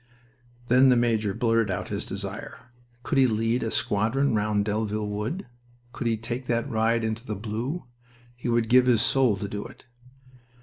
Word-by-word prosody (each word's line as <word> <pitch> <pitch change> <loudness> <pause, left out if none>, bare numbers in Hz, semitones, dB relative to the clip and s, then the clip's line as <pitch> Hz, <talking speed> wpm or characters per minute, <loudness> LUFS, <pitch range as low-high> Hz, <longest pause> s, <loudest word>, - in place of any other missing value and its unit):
Then 125 +2 +5
the 125 - +5
major 115 -4 +1
blurted 115 -2 +2
out 90 - -3
his - - -3
desire. 100 +5 -7 0.3
Could 140 -1 +1
he 130 - +6
lead 115 +2 0
a 115 - -1
squadron 115 +7 +1
round 105 -1 +1
Delville 105 0 -1
Wood? 105 - -3 0.5
Could 120 - -3
he 115 -1 +1
take 120 +3 -5
that 115 -1 0
ride 115 +1 +1
into 110 +1 -2
the 110 -4 -4
blue? 115 - -4 0.5
He 120 0 -4
would 115 -1 +2
give 125 +2 +5
his 115 -3 +4
soul 130 -7 +3
to 100 - -4
do 105 +1 -5
it. - - -13
115 Hz, 175 wpm, -26 LUFS, 105-125 Hz, 0.5 s, he